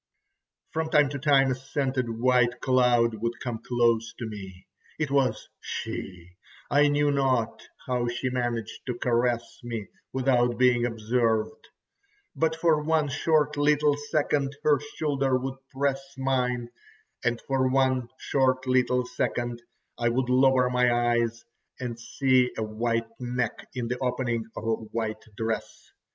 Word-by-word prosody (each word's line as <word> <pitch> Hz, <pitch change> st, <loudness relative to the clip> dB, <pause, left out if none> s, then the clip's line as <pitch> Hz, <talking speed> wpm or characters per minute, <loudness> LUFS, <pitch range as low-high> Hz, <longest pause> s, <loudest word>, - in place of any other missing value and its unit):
ho!" -, -, -64 dB, 0.6 s
From 160 Hz, 0 st, -2 dB
time 150 Hz, -3 st, +4 dB
to 140 Hz, 0 st, -5 dB
time 135 Hz, -2 st, +4 dB
a -, -, +2 dB
scented 130 Hz, -1 st, -2 dB
white 125 Hz, +1 st, +2 dB
cloud 125 Hz, -3 st, +3 dB
would 115 Hz, +1 st, -2 dB
come 120 Hz, -3 st, -4 dB
close 115 Hz, -2 st, +1 dB
to 120 Hz, -, -4 dB
me. 95 Hz, -4 st, -9 dB, 0.3 s
It 150 Hz, -3 st, -2 dB
was 130 Hz, -6 st, +1 dB
she, 90 Hz, -1 st, -6 dB, 0.3 s
I 145 Hz, +1 st, +5 dB
knew 145 Hz, 0 st, +2 dB
not 130 Hz, -5 st, +1 dB, 0.2 s
how 125 Hz, -2 st, 0 dB
she 120 Hz, +2 st, -2 dB
managed 120 Hz, -3 st, -3 dB
to 125 Hz, -2 st, -2 dB
caress 120 Hz, -1 st, 0 dB
me 115 Hz, -4 st, -5 dB, 0.2 s
without 125 Hz, -2 st, +2 dB
being 120 Hz, -1 st, +4 dB
observed, 115 Hz, -1 st, -1 dB, 0.7 s
but 160 Hz, 0 st, +1 dB
for 160 Hz, -2 st, +2 dB
one 155 Hz, -1 st, +1 dB
short 150 Hz, +1 st, +1 dB
little 145 Hz, 0 st, +3 dB
second 145 Hz, -1 st, -1 dB
her 150 Hz, -2 st, +4 dB, 0.2 s
shoulder 135 Hz, -4 st, +1 dB
would 135 Hz, +1 st, -5 dB
press 135 Hz, 0 st, 0 dB, 0.2 s
mine, 125 Hz, -3 st, -1 dB, 0.5 s
and 120 Hz, -1 st, 0 dB
for 135 Hz, -1 st, +1 dB
one 130 Hz, -2 st, +2 dB
short 130 Hz, -1 st, +1 dB
little 125 Hz, -1 st, +2 dB
second 120 Hz, -1 st, -2 dB, 0.4 s
I 120 Hz, 0 st, +2 dB
would 125 Hz, +1 st, 0 dB
lower 130 Hz, 0 st, +4 dB
my 125 Hz, -1 st, +3 dB, 0.2 s
eyes 120 Hz, 0 st, -1 dB, 0.3 s
and 120 Hz, -2 st, -5 dB
see 125 Hz, +1 st, +2 dB
a 110 Hz, -, -1 dB
white 115 Hz, +2 st, -1 dB
neck 125 Hz, 0 st, -3 dB
in 120 Hz, -2 st, -2 dB
the 125 Hz, +1 st, -3 dB
opening 120 Hz, -3 st, -1 dB
of -, -, -5 dB
a 115 Hz, 0 st, +1 dB, 0.2 s
white 110 Hz, -1 st, -2 dB
dress. 110 Hz, 0 st, -4 dB
125 Hz, 145 wpm, -27 LUFS, 120-135 Hz, 0.7 s, I